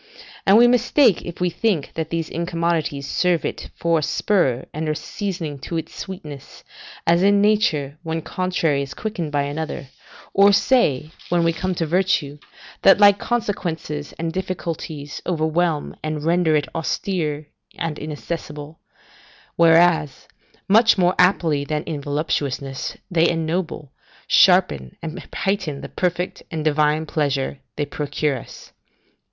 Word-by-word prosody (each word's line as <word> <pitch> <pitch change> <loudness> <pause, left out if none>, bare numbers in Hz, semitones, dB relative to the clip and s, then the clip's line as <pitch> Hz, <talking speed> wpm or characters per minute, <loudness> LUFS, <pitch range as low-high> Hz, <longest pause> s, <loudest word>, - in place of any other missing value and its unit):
And 195 +2 +7
we 240 +1 +7
mistake 245 - +4
if 170 - -8
we 180 -1 +1
think 195 -7 0
that 160 -1 -3
these 165 -1 -2
incommodities 165 -4 -2
serve 175 +2 +1
it - - -5
for 170 -1 +1
a - - -3
spur 145 - +1
and 155 +1 -3
a 155 - 0
seasoning 165 -6 -4
to 165 +6 -4
its 160 - -6
sweetness 150 -8 -9 0.4
(as 170 +1 +4
in 200 +1 +4
nature 155 -9 +1
one 165 -1 -3
contrary 175 -6 0
is 135 -1 -6
quickened 175 -8 -4
by 145 -1 +1
another), 145 -1 -4 0.4
or 200 +1 +6
say, 160 - +2 0.2
when 175 -1 +2
we 165 0 +2
come 185 +3 -2
to 165 - -1
virtue, 160 -4 0 0.4
that 195 - +6
like 205 -1 +7
consequences 170 -11 -3
and 165 0 -4
difficulties 165 -5 -5
overwhelm 160 -1 0
and 155 -1 -3
render 170 -1 +3
it 145 -2 +1
austere 160 -2 -2 0.3
and 165 -2 -3
inaccessible; 150 0 -6 0.8
whereas, 165 -4 +4 0.4
much 225 +2 +5
more 180 -1 +3
aptly 170 -5 +3
than 150 +1 -2
in 150 -3 -5
voluptuousness, 140 -2 -2
they 170 -1 +4
ennoble, 165 -3 -2 0.3
sharpen, 65 -3 +3
and 160 -1 -6
heighten 185 -8 -2
the - - -7
perfect 180 0 -2
and 160 -2 -4
divine 150 +1 +2
pleasure 140 -3 -1 0.2
they 145 - -1
procure 145 -1 -2
us. - - -13
165 Hz, 140 wpm, -22 LUFS, 150-180 Hz, 0.8 s, And